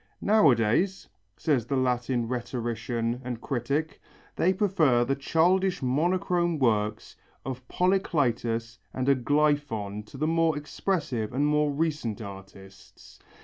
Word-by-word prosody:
"Nowadays," 170 - +3 0.3
says 130 -7 0
the 135 - -1
Latin 125 -1 0
rhetorician 120 -1 -3
and 120 -2 -5
critic, 140 +6 -2 0.3
"they 180 - +3
prefer 170 - +2
the 135 - 0
childish 175 +5 +1
monochrome 175 +5 +1
works 105 -5 0 0.3
of 130 -1 -6
Polycletus 120 -11 0 0.2
and 130 - -1
Aglæphon 140 -6 +1
to 135 - -11
the 150 - 0
more 165 -1 +2
expressive 145 - -2
and 140 +3 +1
more 150 0 +2
recent 145 -7 -2
artists." 95 -2 -12
135 Hz, 110 wpm, -27 LUFS, 115-160 Hz, 0.3 s, Nowadays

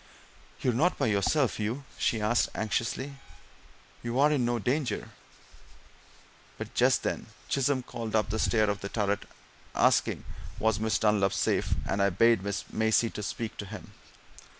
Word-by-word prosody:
"You're 125 - +2
not 160 +10 +2
by - - +1
yourself, 110 +6 +2
Hugh?" 110 +6 -2
she 115 - 0
asked 110 +3 +2
anxiously. 120 +6 -2 0.8
"You're 130 +6 +2
in 140 -4 +2
no 120 0 +1
danger?" 125 +4 -1 1.5
But - - -7
just - - +3
then - - -2 0.2
Chisholm 135 -1 +1
called 115 -3 -5
up 105 -1 +1
the 110 - -1
stair 110 -1 +3
of 100 - -4
the 100 - -4
turret, 100 -2 -1 0.5
asking - - +2 0.3
was 110 -1 +1
Miss 110 -1 +1
Dunlop 105 -3 +2
safe, - - +1
and 100 - 0
I 100 - +4
bade 115 +3 +4 0.3
Maisie 110 +1 +2
speak 110 +2 -4
to 100 - -5
him. 105 0 -9
110 Hz, 145 wpm, -29 LUFS, 105-125 Hz, 1.5 s, I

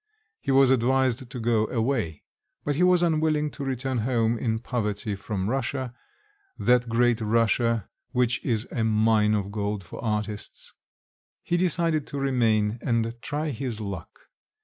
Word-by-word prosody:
He - - -6
was 135 -1 +6
advised 130 0 +2
to 125 -1 -6
go 110 -2 +2
away; 115 - -1 0.4
but 145 - 0
he 160 - 0
was 180 -1 +5
unwilling 155 -2 +1
to 140 - -6
return 130 -1 -1
home 115 0 +1
in 115 -1 -1
poverty 105 -3 -2
from 100 -1 -3
Russia, 130 0 -2 0.6
that 125 -1 +3
great 120 0 +2
Russia 115 0 +2 0.2
which 125 -1 0
is 115 -2 -1
a 115 - -1
mine 110 -1 +3
of 100 -1 -2
gold 105 -1 -2
for 85 - -9
artists; 105 -2 -3 0.7
he 175 - 0
decided 170 -3 +1
to 140 - -4
remain 115 -5 +1
and 115 -1 0
try 150 +1 -2
his 125 -3 -4
luck. 100 -5 -7
120 Hz, 150 wpm, -26 LUFS, 110-135 Hz, 0.7 s, was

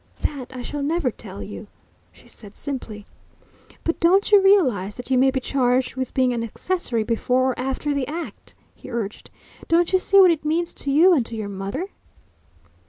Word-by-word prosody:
"That 275 -4 -3
I 255 -1 -7
shall 290 +3 -5
never 295 -2 0
tell 200 -3 -9
you," 210 +1 -9 0.4
she - - -20
said 205 -2 -12
simply. 230 -7 -6 0.8
"But 330 - -1
don't 380 +5 +3
you 410 -1 +7
realise 255 - +3
that 245 +1 -8
you 260 - +4
may 265 +1 +5
be 265 0 -1
charged 255 -1 0
with 260 -1 -4
being 255 -1 +2
an 230 -1 -2
accessory 240 - -2
before 250 +3 +1
or 245 - -7
after 270 +3 -2
the 280 -2 -2
act?" 330 +3 -7 0.2
he - - -13
urged. 225 -4 -5 0.4
"Don't 340 +2 +2
you 375 - +5
see 395 +1 +4
what 370 -2 +8
it 320 -3 -2
means 330 +3 -1
to 280 - -5
you 330 +7 +6
and 280 -8 +3
to 230 - -7
your 215 -2 -4
mother?" 200 - -5
265 Hz, 190 wpm, -22 LUFS, 235-330 Hz, 0.8 s, what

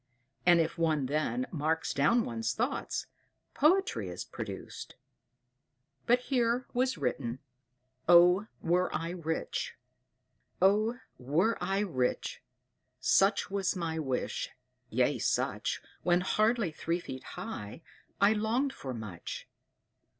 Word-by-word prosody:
And 175 -1 +7
if 165 +1 0
one 155 -4 +2
then 155 - 0
marks 160 0 0
down 220 +12 +3
one's 115 -1 -2
thoughts, 245 +5 -1 0.5
poetry 380 +8 +2
is - - -5
produced. - - -7 1.1
But 245 +1 +4
here 245 -1 +1
was 255 -4 +1
written: 125 -3 -2 0.7
OH, 180 +4 +7 0.2
WERE 180 +2 +2
I 165 +2 -2
RICH! 165 -2 -3 0.8
"Oh, 215 +5 +3 0.2
were 160 - +2
I 195 +2 +1
rich! 130 -11 -1 0.6
Such 195 0 +3
was 195 -1 0
my 165 -3 -2
wish, 135 -5 -2 0.4
yea - - +2
such - - 0 0.2
When 175 0 +3
hardly 215 0 +2
three 165 +3 -2
feet 130 -6 -7
high, 160 - -6 0.4
I 200 +2 +6
longed 235 +6 0
for 130 -2 -6
much. 105 -7 -7
175 Hz, 115 wpm, -31 LUFS, 155-220 Hz, 1.1 s, And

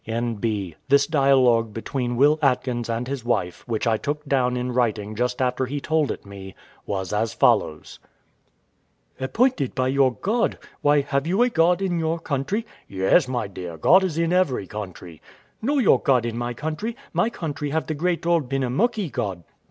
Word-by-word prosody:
N.B. 110 -5 -2 0.2
This 140 0 +5
dialogue 130 -7 +3
between 120 +1 -3
Will 145 +5 +4
Atkins 125 -3 0
and 115 +2 -2
his 135 -3 -4
wife, 100 -7 -1
which 115 -1 -2
I 115 -2 +2
took 150 +5 -4
down 125 -3 +1
in 125 0 -2
writing 110 -4 0
just 125 +3 -1
after 130 0 0
he 145 +3 -3
told 155 0 0
it - - -5
me, 95 -1 -10 0.3
was 95 -1 -3
as 105 -1 -1
follows: 75 0 +1 1.2
Wife. 130 - -3
Appointed 240 - +1
by 130 -1 +1
your 135 -1 +3
God! 220 - 0 0.2
Why, 145 0 +4
have 140 +1 -1
you 195 +7 +3
a 250 - +2
God 175 -1 +2
in 175 -3 0
your 160 +1 0
country? 165 - -2 0.2
W.A. 95 -1 -1
Yes, 165 -7 +5
my 125 -4 -2
dear, 90 -4 -8
God 185 - +5
is 175 -5 -2
in 165 +1 +1
every 175 - +1
country. 90 -5 -8
Wife. - - -25
No 280 +6 0
your 250 -8 +4
God 130 -6 +2
in 115 -1 -3
my 120 0 -3
country; 160 - -4 0.2
my 230 - +2
country 150 -8 -4
have 160 +2 -1
the 155 - -3
great 170 +3 -1
old 170 -6 +1
Benamuckee 140 - 0
God. 95 -7 -3
130 Hz, 185 wpm, -23 LUFS, 115-160 Hz, 1.2 s, This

